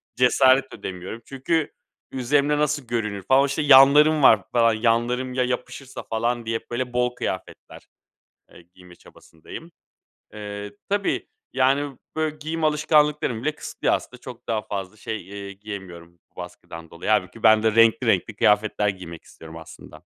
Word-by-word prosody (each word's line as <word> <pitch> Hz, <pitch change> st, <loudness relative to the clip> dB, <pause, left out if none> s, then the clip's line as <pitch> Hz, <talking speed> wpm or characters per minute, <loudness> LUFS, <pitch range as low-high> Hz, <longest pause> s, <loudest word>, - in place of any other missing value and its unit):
cesaret 130 Hz, +1 st, +3 dB
edemiyorum 95 Hz, +5 st, -7 dB
çünkü 145 Hz, +4 st, -2 dB, 0.4 s
üzerimde 145 Hz, +3 st, +1 dB
nasıl 150 Hz, -3 st, -1 dB
görünür 105 Hz, -4 st, -3 dB
falan, 130 Hz, +6 st, +4 dB
o, -, -, +2 dB
işte, 140 Hz, +2 st, -2 dB
yanlarım 145 Hz, +2 st, +6 dB
var 105 Hz, -7 st, +6 dB
falan. 115 Hz, -2 st, +4 dB
Yanlarım 120 Hz, +3 st, 0 dB
ya 125 Hz, 0 st, +1 dB
yapışırsa 125 Hz, +2 st, -5 dB
falan 120 Hz, +1 st, -2 dB
diye 115 Hz, 0 st, -2 dB
hep -, -, -31 dB
böyle 125 Hz, 0 st, -3 dB
bol 125 Hz, 0 st, 0 dB
kıyafetler, 95 Hz, -, -7 dB, 0.6 s
eee, -, -, -15 dB
giyme 90 Hz, -1 st, -16 dB
çabasındayım. 85 Hz, -, -13 dB, 0.6 s
Eee, 105 Hz, -1 st, -7 dB, 0.2 s
tabii, 200 Hz, 0 st, -1 dB, 0.3 s
yani, 135 Hz, +1 st, +1 dB, 0.2 s
böyle 155 Hz, -1 st, -1 dB
giyim 160 Hz, +2 st, -5 dB
alışkanlıklarımı 150 Hz, -5 st, +1 dB
bile 155 Hz, -, +1 dB
kısıtlıyor -, -, -2 dB
aslında. 125 Hz, -, -8 dB
Çok 125 Hz, -3 st, -11 dB
daha 110 Hz, -2 st, -1 dB
fazla 100 Hz, 0 st, -6 dB
şey, 110 Hz, -4 st, -6 dB
eee, 100 Hz, -1 st, -8 dB
giyemiyorum 95 Hz, -4 st, -10 dB
bu -, -, -45 dB
baskıdan 85 Hz, -2 st, -10 dB
dolayı. 85 Hz, +4 st, -6 dB
Hâlbuki 105 Hz, +1 st, -1 dB
ben 110 Hz, -1 st, +5 dB
de 110 Hz, -1 st, +1 dB
renkli 115 Hz, +2 st, +4 dB
renkli 105 Hz, 0 st, +1 dB
kıyafetler 105 Hz, 0 st, +2 dB
giymek 90 Hz, -4 st, -8 dB
istiyorum 80 Hz, 0 st, -13 dB
aslında. 80 Hz, 0 st, -13 dB
115 Hz, 150 wpm, -23 LUFS, 100-135 Hz, 0.6 s, yanlarım